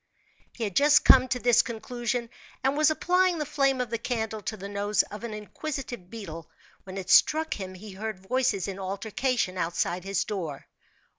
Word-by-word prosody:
He 235 - -5
had 200 -4 -3
just 290 +4 +5
come 255 -1 +7
to 255 0 0
this 245 -2 +5
conclusion, 235 +1 -3 0.3
and 270 +1 +2
was 305 +1 +4
applying 360 +3 +2
the 300 - -2
flame 275 -2 +1
of 250 -2 -2
the 230 - -1
candle 220 -3 -2
to 215 - -4
the 195 0 -7
nose 205 +1 +1
of 210 +2 -10
an 235 - -4
inquisitive 235 -1 -6
beetle, 165 -8 -8 0.4
when 190 0 -7
it 190 -1 -3
struck 315 +1 +5
him 185 -2 -6
he 205 +3 -10
heard 215 +2 -5
voices 210 0 0
in 195 -1 -5
altercation 200 +1 -1
outside 170 +1 -1
his 195 0 0
door. 170 -9 -5
220 Hz, 180 wpm, -27 LUFS, 195-255 Hz, 0.4 s, come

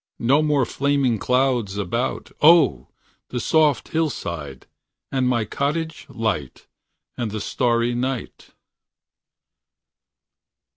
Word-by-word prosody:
No 135 +6 +3
more 150 -4 +2
flaming 135 -4 0
clouds 125 -5 +1
0! 120 - +2 0.4
the 125 - -3
soft 150 -2 +2
hillside. 85 - -3 0.5
And 130 -2 +1
my 120 -3 +1
cottage 160 +7 -3
light. 105 - -3 0.5
And 120 -3 -3
the 105 +1 -4
starry 120 +2 0
night. 125 +1 -4
125 Hz, 90 wpm, -22 LUFS, 110-140 Hz, 0.5 s, No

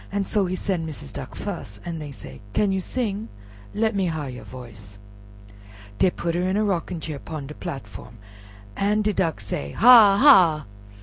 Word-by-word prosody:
So 200 -1 0
he 185 - -2
sen' 185 -3 -2
Missis 150 - -7
Duck - - -8
fus, 100 0 -6
an' 170 -2 -4
dey 150 -1 -7
said, 130 - -11
"Can 205 -2 +2
you 190 0 -1
sing? 220 -1 -3 0.5
let 220 +1 +1
me 195 -2 +1
har 155 -5 -3
you 125 - -9
voice." 110 -6 -12 1.0
Dey 185 - +5
put 170 -1 -3
her 180 +2 0
in 190 - 0
a 215 - +2
rocking 180 -3 -2
chair 155 -2 -6
'pon 155 -2 -7
de 150 - -8
platform, 135 - -8 0.6
an' 210 +2 +1
de 210 0 +1
Duck 165 -5 0
say, 70 0 -5
"Hahh! 220 -4 +8
hahh!" 180 - +6
175 Hz, 180 wpm, -24 LUFS, 145-200 Hz, 1.0 s, Hahh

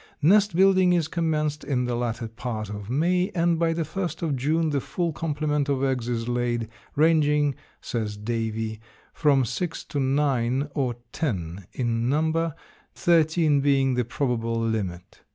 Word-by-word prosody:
Nest 200 +2 +5
building 185 -1 +5
is 170 -3 +1
commenced 155 -3 -1
in 125 -3 0
the 125 - -1
latter 120 -1 -2
part 110 -2 -5
of 105 0 -7
May, 180 - +2
and 170 -1 +2
by 165 -1 +2
the 165 0 -1
first 175 +3 -4
of 155 -4 0
June 155 +5 +1
the 140 -2 0
full 165 +5 -2
complement 150 -2 -1
of 135 -1 0
eggs 130 -3 0
is 115 -1 -2
laid, 120 -2 -1 0.3
ranging, 150 -2 +3 0.3
says 105 -3 -3
Davie, 110 0 -3 0.3
from 140 -4 +3
six 165 +8 -3
to 145 - -4
nine 135 -1 +1
or 130 -4 -1 0.2
ten 95 - -3
in 120 -1 -1
number, 160 +2 +1 0.4
thirteen 160 -3 +3
being 135 -2 +3
the 125 0 +1
probable 115 -2 -1
limit. 100 -6 -3
140 Hz, 155 wpm, -25 LUFS, 120-160 Hz, 0.4 s, Nest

